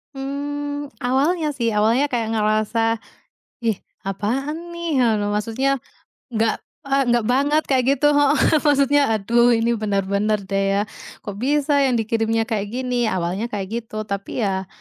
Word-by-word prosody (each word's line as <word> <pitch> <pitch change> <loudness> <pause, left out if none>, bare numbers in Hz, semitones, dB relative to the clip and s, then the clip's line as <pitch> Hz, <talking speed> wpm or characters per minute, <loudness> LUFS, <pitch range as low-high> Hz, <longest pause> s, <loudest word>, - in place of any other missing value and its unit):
Mmm, 290 +1 -4
awalnya 290 +6 +1
sih, 230 -3 0
awalnya 225 +6 +3
kayak 235 -3 0
ngerasa, 215 +1 +1 0.7
ih, 220 -4 0 0.2
apaan 270 - -3
nih, 340 -5 -1 0.3
maksudnya 245 +6 0 0.5
enggak, 220 0 +1 0.2
eee, 275 -1 +1
nggak 240 -2 +2
banget 290 +4 +2
kayak 255 -2 +3
gitu 290 +2 +1
heeh. 290 0 +4 0.3
Maksudnya, 285 0 +4
aduh 235 +3 +3
ini 230 +1 +1
benar-benar 200 0 0
deh 195 0 +1
ya, 200 - +2 0.4
kok 205 -2 -6
bisa 290 +4 +1
yang 255 - +1
dikirimnya 225 0 +1
kayak 210 -2 -1
gini, 250 -2 0
awalnya 185 +4 -1
kayak 205 -4 -4
gitu. 215 -2 -6
Tapi 200 +3 -4
ya, 190 -1 -1
235 Hz, 140 wpm, -21 LUFS, 215-275 Hz, 0.7 s, heeh